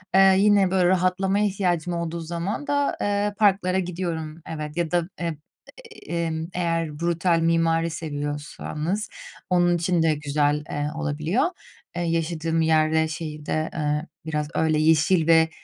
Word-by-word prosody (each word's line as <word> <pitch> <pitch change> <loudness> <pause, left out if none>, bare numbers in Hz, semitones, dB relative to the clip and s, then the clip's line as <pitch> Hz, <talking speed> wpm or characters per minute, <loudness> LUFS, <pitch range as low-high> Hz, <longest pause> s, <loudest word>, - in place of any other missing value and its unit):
Eee, 195 0 +7
yine, 200 -2 +4
böyle, 185 -2 +3
rahatlamaya 190 +2 +2
ihtiyacım 180 -4 0
olduğu 170 0 -3
zaman 170 - -4
da, 285 0 0
eee, 205 0 0
parklara 190 -3 +3
gidiyorum, 170 -3 -4
evet, 155 0 -6
ya 170 -2 -1
da, 175 0 0
emm, 170 -2 -3 0.7
eee, 170 -1 -1 0.2
eğer 165 -3 -1
brutal 170 0 +1
mimari 165 0 +2
seviyorsanız 150 +4 -4 0.4
onun 175 -1 +3
için 175 0 +1
de 155 -2 +3
güzel, 150 0 0
eee, 145 0 -2
olabiliyor. 160 - 0 0.5
Eee, 175 - -2
yaşadığım 165 -1 -1
yer 155 -1 +3
ve 160 0 +2
şeyi 155 -1 -6
de, 155 +1 -1
eee, 150 0 -1 0.2
biraz 150 -2 -2
öyle 155 -1 +2
yeşil 160 +2 +3
ve, 160 -1 +5
165 Hz, 140 wpm, -24 LUFS, 155-180 Hz, 0.7 s, Eee